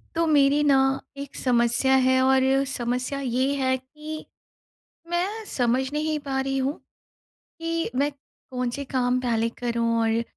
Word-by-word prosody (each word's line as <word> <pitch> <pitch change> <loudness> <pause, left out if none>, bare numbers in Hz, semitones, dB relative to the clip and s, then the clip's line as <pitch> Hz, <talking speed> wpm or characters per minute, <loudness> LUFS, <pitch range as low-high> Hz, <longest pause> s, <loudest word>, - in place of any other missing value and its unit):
तो 335 - +2
मेरी 290 -1 +4
ना 280 -2 +5 0.4
1 280 -1 -8
समस्या 240 +1 +2
है 260 0 +4
और 265 0 +4 0.3
समस्या 250 +2 -2
ये 260 +2 0
है 260 -1 +1
कि 305 +4 -9 0.9
मैं 390 +6 -1
समझ 250 -3 +1
नहीं 305 +1 -1
पा 270 -2 -2
रही 270 0 -1
हूँ 270 +3 -1 0.8
कि 330 -2 -2
मैं 285 +2 +2
कौन 250 -2 -6
से 280 +3 -5
काम 255 -1 0
पहले 230 -2 0
करूँ 235 -1 0
और 225 0 +1
265 Hz, 145 wpm, -25 LUFS, 250-290 Hz, 0.9 s, ना